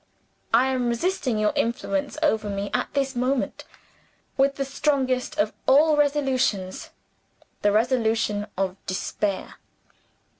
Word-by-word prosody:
I 235 +3 +5
am 250 -2 0
resisting 255 - 0
your 215 0 +1
influence 285 +5 -1
over 220 -8 +1
me 200 0 -3
at 250 - -1
this 275 -1 0
moment, 255 +2 -1 0.7
with 275 0 +2
the 275 - -2
strongest 270 -2 0
of 210 +1 +1
all 300 +3 +6
resolutions 265 -10 0 0.7
the 205 - +3
resolution 220 -2 +1
of 190 0 -2
despair. 190 +1 -3
250 Hz, 115 wpm, -24 LUFS, 210-275 Hz, 0.7 s, all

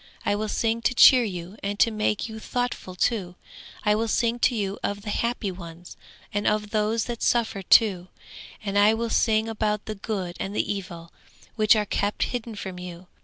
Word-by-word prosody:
I - - +2
will 215 +1 -2
sing 225 +2 0
to 250 - +1
cheer 255 0 +8
you 185 -1 -6
and 200 +1 -3
to 230 - +4
make 215 0 -1
you 220 -1 -8
thoughtful 245 -6 -3
too; 180 -3 -1 0.5
I 210 - +3
will 225 +2 0
sing 235 +2 +1
to 245 - +2
you 200 -2 -2
of 200 0 -3
the 210 - -4
happy 235 -3 -1
ones, 170 -1 -10 0.4
and 205 0 0
of 210 0 0
those 215 +1 0
that 240 -1 -5
suffer 225 -4 +1
too. 190 -2 +4 0.6
I 205 +2 +4
will 230 0 -3
sing 220 -1 +2
about 210 -2 -1
the 215 - -4
good 195 -4 -4
and 200 +2 -4
the - - 0
evil, 175 -4 -8 0.4
which 215 0 +5
are 210 -1 +1
kept 205 +1 -1
hidden 235 -2 -4
from 190 -3 -6
you. 180 0 -9
210 Hz, 190 wpm, -25 LUFS, 195-225 Hz, 0.6 s, cheer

